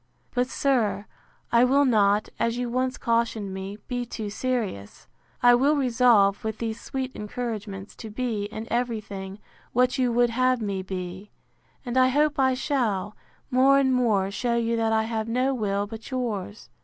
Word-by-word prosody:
—But, 250 0 +1
sir, 220 -8 0 0.5
I 235 +1 +5
will 275 +3 +4
not, 210 -4 +3
as 230 +1 0
you 245 -1 -2
once 255 +1 -1
cautioned 230 -4 0
me, 190 +2 -6
be 245 -1 -2
too 220 -3 -6
serious. 215 - -3 0.4
I 245 0 +8
will 275 +5 +4
resolve, 235 -7 +3
with 220 -1 -3
these 225 -1 -4
sweet 265 -1 -4
encouragements, 210 -3 -5
to 225 - -8
be, 220 -2 -2
in 215 +2 -6
every 235 -1 0
thing, 195 -2 -8 0.4
what 250 +2 +2
you 250 -2 +2
would 240 0 +3
have 255 +1 +2
me 200 -3 -2
be: 185 +1 -6 0.6
And 245 +1 -2
I 255 0 +6
hope 295 +2 +2
I 260 -1 +3
shall, 220 -8 -1 0.4
more 265 +2 +5
and 265 -1 +3
more, 210 -6 +2
shew 235 +4 -1
you 230 0 0
that 225 -1 +1
I 220 0 +2
have 220 -1 -3
no 255 +4 +1
will 205 -4 -1
but 220 +1 -9
yours. 220 -6 -4
230 Hz, 170 wpm, -25 LUFS, 205-255 Hz, 0.6 s, I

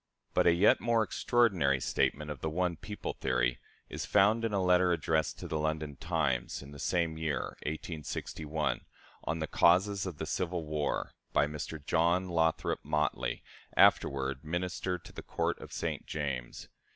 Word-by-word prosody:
" - - -46
But - - +3
a - - +8
yet 95 +5 +5
more 115 -1 +3
extraordinary 100 - +2
statement 75 +3 0
of 70 - -7
the 80 - -1
"one 90 +2 0
people" 105 +5 -5
theory 60 0 0 0.3
is - - -5
found 110 +4 +4
in 115 - 0
a 100 - +1
letter 90 -1 +4
addressed 80 -1 0
to - - -7
the 80 - -2
London 75 -1 -2
"Times," 70 -7 -1
in 70 - -11
the 70 - -10
same 85 0 0
year, 80 -3 -2
1861, 75 -2 -3 0.4
on 80 - -1
the 80 - -1
"Causes 95 +5 +3
of 85 -5 -6
the 80 - -3
Civil 85 +1 -2
War," 75 -1 -2 0.2
by 70 - +4
Mr. 75 0 -6
John 85 +3 +2
Lothrop 80 -1 +1
Motley, 75 -5 -1 0.3
afterward 70 0 +3
Minister 90 +2 -2
to 85 - -14
the - - -7
Court - - -1
of - - -10
St. - - -3
James. 70 -5 -4
80 Hz, 165 wpm, -31 LUFS, 75-90 Hz, 0.4 s, a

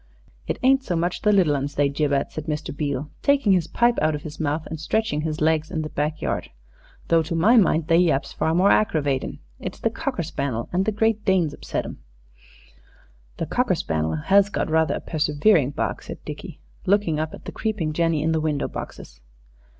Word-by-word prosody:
"It - - -1
ain't 265 +1 +4
so 180 - -2
much 170 +2 -1
the 210 - +3
little 180 -8 +4
'uns 140 +1 -3
they 145 0 +3
jib 145 +1 -1
at," 140 0 0
said 155 - -6
Mr. 150 -2 -4
Beale, 145 -1 -3
taking 280 -7 +3
his 180 -4 +3
pipe 240 0 +2
out 155 0 +2
of 145 - -7
his 155 0 -8
mouth 155 0 -1
and 160 - -6
stretching 165 -1 0
his 155 0 -3
legs 160 0 +2
in 160 -4 -2
the 155 - -5
back 150 +1 -2
yard, - - -2 0.6
"though 165 -1 +5
to 165 +2 -3
my 205 +9 +5
mind 165 -8 +4
they 165 0 +4
yaps 145 -6 +1
far 160 +1 0
more 190 +3 +4
aggravatin'. 145 -10 +1 0.2
It's - - -6
the - - 0
cocker - - -3
spannel 120 -4 -3
and 185 +2 +1
the 220 - +1
Great 220 0 +1
Danes 185 -7 +2
upsets - - -4
them." - - -8 1.4
"The - - -2
cocker - - +1
spannel 80 0 -1
has 200 +1 +4
got 205 - -2
rather 160 0 +2
a - - -5
persevering 150 0 +2
bark," 145 - -3
said - - -9
Dickie, - - -8 0.3
looking 190 -6 +2
up 155 0 -3
at - - -16
the - - -5
creeping 205 -9 -2
jenny 165 -2 +1
in 160 - +1
the 160 -1 +1
window 150 -2 -1
boxes. - - -9
160 Hz, 205 wpm, -23 LUFS, 150-190 Hz, 1.4 s, though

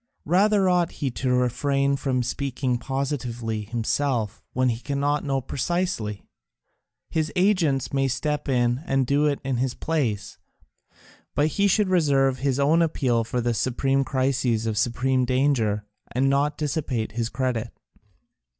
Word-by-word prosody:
Rather 195 +4 +3
ought 175 -2 +2
he 140 -4 -2
to 130 +2 -2
refrain 140 +3 +1
from 130 -2 -1
speaking 125 -1 -2
positively 125 -5 -3
himself 115 0 -1
when 130 0 +1
he 115 -1 -2
cannot 145 +2 -1
know 135 -2 0
precisely; 130 - -2 0.9
his 155 -2 0
agents 180 - +2
may 135 -1 +2
step 145 +3 -2
in 120 0 +1
and 135 -1 +2
do 145 +4 +2
it 145 -1 0
in 135 -2 -1
his 130 0 -1
place; 115 - -2 1.0
but 150 +2 +3
he 200 +6 +2
should 205 +1 +3
reserve 135 -7 +2
his 135 0 0
own 155 +4 +4
appeal 130 -8 +1
for 120 +2 -2
the 120 0 0
supreme 135 +3 +1
crises 130 -4 0
of 110 -1 -1
supreme 125 +4 +1
danger, 125 -5 +1 0.3
and 130 +2 +2
not 140 +2 +1
dissipate 140 -7 -2
his 115 +1 -2
credit." 120 -2 -2
135 Hz, 140 wpm, -24 LUFS, 120-145 Hz, 1.0 s, own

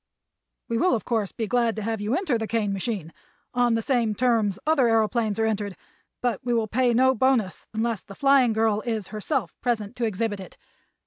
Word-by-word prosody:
"We 230 0 -1
will, 365 -3 +3
of 220 - -4
course, 220 -5 -1
be 225 - -3
glad 235 0 +1
to 215 - -4
have 225 -1 -2
you 215 +5 0
enter 345 -7 0
the 225 -1 -2
Kane 210 -3 0
machine, 195 -5 -3 0.4
on 245 -2 +2
the 225 - -1
same 235 -5 +1
terms 225 -5 +2
other 305 -4 +3
aëroplanes 225 -1 +1
are 225 - +1
entered; 205 -3 -2 0.5
but 240 -5 -1
we 240 -1 0
will 225 -2 +1
pay 245 +3 +2
no 260 +2 +5
bonus 245 -6 +1
unless 225 -1 -1
'The 195 - -12
Flying 275 -2 +4
Girl' 220 -1 +1
is 220 -4 -3
herself 215 - -2
present 225 -3 -1
to 240 - 0
exhibit 215 -1 -2
it. 190 - -11
225 Hz, 200 wpm, -25 LUFS, 210-245 Hz, 0.5 s, no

